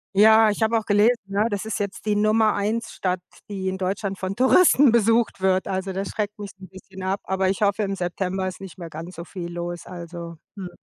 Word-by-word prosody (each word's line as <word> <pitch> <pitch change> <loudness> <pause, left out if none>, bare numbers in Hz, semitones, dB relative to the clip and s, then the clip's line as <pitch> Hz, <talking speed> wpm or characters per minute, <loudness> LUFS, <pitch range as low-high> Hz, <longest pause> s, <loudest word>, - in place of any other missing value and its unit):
Ja, 220 +1 +6
ich 205 - -5
habe 225 +1 +3
auch 220 - -3
gelesen, 215 +3 +4
ne, 200 +3 0
das 205 0 -3
ist 220 - -3
jetzt 200 +1 -4
die 210 -1 +1
Nummer 215 +1 +3
1 215 +3 -2
Stadt, 185 -1 -2 0.3
die 190 -2 -4
in 190 0 -2
Deutschland 195 +1 -2
von 190 +1 -3
Touristen 265 - +5
besucht 230 -2 +2
wird. 190 0 +2
Also 190 0 -2
das 195 +1 -3
schreckt 210 -1 -3
mich 205 -1 -7
'n 190 - -11
bisschen 190 0 -12
ab, 190 +2 -1
aber 190 0 0
ich 195 +3 -1
hoffe, 200 +1 +2
im 195 -1 -1
September 185 +1 -2
ist 185 - -7
nicht 190 -3 -10
mehr 170 -2 -8
ganz 165 +4 -8
so 170 - -7
viel 175 -1 -7
los. 175 0 -5
Also, 170 -1 -8 0.2
hm, 190 -3 -6
195 Hz, 225 wpm, -23 LUFS, 185-215 Hz, 0.3 s, Ja